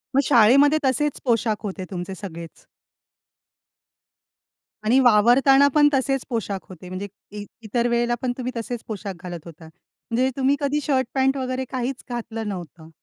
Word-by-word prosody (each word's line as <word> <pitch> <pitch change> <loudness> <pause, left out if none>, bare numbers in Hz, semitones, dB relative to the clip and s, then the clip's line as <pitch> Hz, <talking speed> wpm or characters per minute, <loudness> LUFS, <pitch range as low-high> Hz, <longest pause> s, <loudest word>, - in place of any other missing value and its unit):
मग 275 - +5
शाळेमध्ये 275 +5 +5
तसेच 285 +3 0
पोशाख 225 -3 0
होते 190 -2 -5
तुमचे 185 +1 -5
सगळेच? 170 -4 -9 2.2
आणि 240 +5 +4
वावरताना 260 +4 +5
पण 295 -1 +6
तसेच 270 0 0
पोशाख 205 -5 -2
होते 180 0 -11
म्हणजे 190 +2 -5 0.3
इ 205 - -6 0.2
इतर 235 +3 0
वेळेला 240 0 +1
पण 255 -1 0
तुम्ही 255 0 -3
तसेच 230 0 -5
पोशाख 205 -2 -5
घालत 175 -2 -6
होता. 165 -1 -12
म्हणजे 230 +9 -4
तुम्ही 270 +1 +2
कधी 290 +1 0
शर्ट 260 -4 +1
पॅंट 270 0 +2
वगैरे 255 0 -3
काहीच 255 0 -3
घातलं 225 -2 -5
नव्हतं. 170 -4 -7
240 Hz, 145 wpm, -23 LUFS, 200-265 Hz, 2.2 s, पण